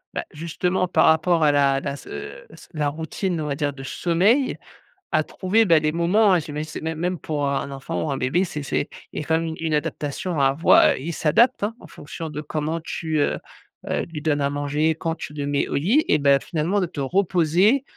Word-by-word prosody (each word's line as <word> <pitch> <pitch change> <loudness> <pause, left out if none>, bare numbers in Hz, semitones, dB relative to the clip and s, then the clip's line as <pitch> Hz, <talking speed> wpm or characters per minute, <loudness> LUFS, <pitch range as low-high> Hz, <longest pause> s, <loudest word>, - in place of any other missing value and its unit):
bah - - -2
justement, 180 +4 -1
par 160 -2 +3
rapport 160 +1 +3
à 150 - +5
la 140 -1 +3
la 140 -1 -3
se - - -9 0.3
la 150 -2 0
routine, 165 +4 -3
on - - -3
va 140 - -1
dire 145 0 -1
de 135 -1 -10
sommeil, 190 - +1 0.5
à 155 - +2
trouver, 215 +4 +1
bah, 165 -4 +5
des 155 - +1
moments, 180 +4 +3
j'imagine 150 -1 -5
c'est - - -6
même 160 0 -3
même 180 0 -1
pour 150 -2 -2
un 140 0 -2
enfant 135 0 -4
ou - - -1
un 135 - -1
bébé, 155 +10 +1
c'est, 150 -4 -5
c'est 145 - -1 0.2
il - - -5
y - - -4
a - - -13
quand 160 - +3
même 165 0 -1
une 160 0 -5
une 160 -1 -2
adaptation 150 +3 -2
à 140 - +4
avoi 140 +5 +5
il 155 +6 -4
s'adaptent 185 - +3
hein, 215 +3 -1
en 175 - -12
fonction 160 +2 -8
de 150 -1 -6
comment 155 +2 -3
tu, 160 -1 -3
heu, 145 - +1 0.5
heu, - - 0
lui 160 -3 -7
donnes 150 -2 +1
à 140 - +1
manger, 145 +2 0
quand 165 +1 -3
tu 150 - -8
le 145 -1 -4
mets 145 0 0
au - - -3
lit, 215 - +2
et 150 - +3
bah, 140 -1 +4
finalement 170 +7 -1
de 185 - +1
te 160 -4 -6
reposer 185 - +2
160 Hz, 225 wpm, -23 LUFS, 145-175 Hz, 0.5 s, à